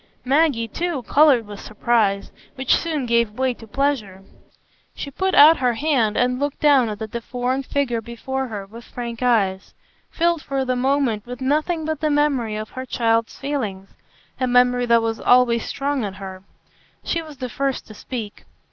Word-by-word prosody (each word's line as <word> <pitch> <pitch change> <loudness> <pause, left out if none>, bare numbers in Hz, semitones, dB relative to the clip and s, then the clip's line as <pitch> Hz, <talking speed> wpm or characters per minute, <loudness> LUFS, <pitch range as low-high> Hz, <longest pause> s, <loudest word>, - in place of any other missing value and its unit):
Maggie, 275 -4 +2
too, 330 +2 -3
coloured 280 -6 +4
with 205 -1 -9
surprise, 215 -2 0 0.2
which 265 -1 +2
soon 310 -5 -2
gave 235 -2 +1
way 260 -1 +1
to 225 -1 -14
pleasure. 215 -7 -2 0.7
She 280 - -6
put 380 +7 -1
out 310 +3 +8
her 245 -2 +1
hand 245 -6 +1
and 250 +1 +1
looked 285 0 -2
down 275 -6 +4
at 210 - -5
the 220 - -4
deformed 245 +4 -3
figure 245 -5 -1
before 265 +4 -4
her 205 -4 -6
with 230 +4 -12
frank 235 -1 -7
eyes, 200 -6 +1 0.3
filled 340 -1 +1
for 270 -2 -2
the 255 0 0
moment 250 -4 0
with 250 0 -7
nothing 310 +4 0
but 315 -2 -2
the 310 - 0
memory 285 -7 +1
of 215 0 -5
her 260 - -6
child's 230 -1 0
feelings,—a 255 -2 -5
memory 245 0 +3
that 235 -1 +4
was 225 0 -2
always 245 -2 +3
strong 280 -2 -2
in 195 -2 -4
her. 190 -1 -8 0.6
She 335 - -1
was 310 -3 -11
the 255 -1 -4
first 270 +2 -2
to 215 - -12
speak. 215 -1 -7
250 Hz, 175 wpm, -22 LUFS, 225-280 Hz, 0.7 s, out